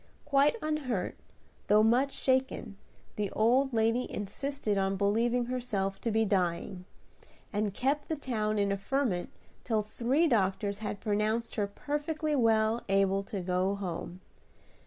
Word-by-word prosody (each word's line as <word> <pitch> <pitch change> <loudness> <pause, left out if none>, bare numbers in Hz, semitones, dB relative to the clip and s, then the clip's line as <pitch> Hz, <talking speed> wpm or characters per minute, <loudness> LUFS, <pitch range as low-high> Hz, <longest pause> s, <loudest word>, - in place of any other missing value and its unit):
Quite 285 +3 +4
unhurt, 275 -11 -2 0.5
though 210 +1 +5
much 250 +5 +3
shaken, 260 -6 0 0.4
the 205 -2 -1
old 255 +5 +3
lady 230 +2 +1
insisted 215 +2 -3
on 195 0 +1
believing 230 +5 +1
herself 220 -6 -2
to 235 - -1
be 220 0 +2
dying, 180 -1 -1 0.7
and 205 0 0
kept 275 +8 -1
the 320 - 0
town 215 -7 -1
in 200 -1 +1
a 200 - 0
ferment 195 -4 -1 0.3
till 220 -3 0
three 245 +9 +1
doctors 200 -4 +1
had 210 -1 -4
pronounced 215 +2 0
her 205 -2 0
perfectly 295 +7 -2
well 225 -2 +3
able 195 0 +3
to 195 -1 -4
go 185 +2 0
home. 180 -1 -5
220 Hz, 135 wpm, -30 LUFS, 200-255 Hz, 0.7 s, though